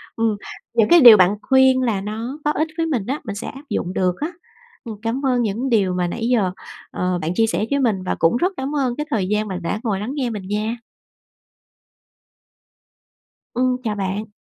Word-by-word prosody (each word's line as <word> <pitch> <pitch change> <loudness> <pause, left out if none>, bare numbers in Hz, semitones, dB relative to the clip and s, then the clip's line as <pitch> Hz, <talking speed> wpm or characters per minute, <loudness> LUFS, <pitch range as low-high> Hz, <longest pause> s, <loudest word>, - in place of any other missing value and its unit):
Ừm, 225 -2 0 0.4
những 225 -2 +3
cái 345 - +8
điều 235 -4 +10
bạn 185 +1 +4
khuyên 265 -1 +4
là 225 -6 0
nó 225 +7 -5
có 295 - +3
ích 310 +1 0
với 330 - +1
mình 260 -11 -1
á, 275 +4 -2
mình 200 -3 -5
sẽ 215 - -6
áp 275 - -9
dụng 180 - -2
được 180 -2 +1
á. 310 +4 -2 0.5
Ừm, 225 -3 -7
cảm 235 +5 -2
ơn 250 -2 +2
những 230 +4 -1
điều 200 -6 +2
mà 180 -1 0
nãy 225 +6 -3
giờ, 220 -7 +2 0.4
ờ, 180 -1 -1
bạn 160 +2 -2
chia 225 - +3
sẻ 215 - -1
với 280 - +2
mình 215 -8 0
và 185 - -2
cũng 165 +8 +3
rất 365 +9 0
cảm 270 +3 -3
ơn 260 -4 0
cái 300 - -3
thời 210 -9 0
gian 210 +2 0
bạn 185 -2 -5
đã 170 +5 -2
ngồi 205 -5 -1
lắng 210 +5 -4
nghe 265 -4 -1
mình 205 -4 -6
nha! 215 +3 -2 2.8
Ừm, 255 +1 +1
chào 215 -3 -2
bạn. 200 +2 -3
225 Hz, 210 wpm, -21 LUFS, 200-260 Hz, 2.8 s, điều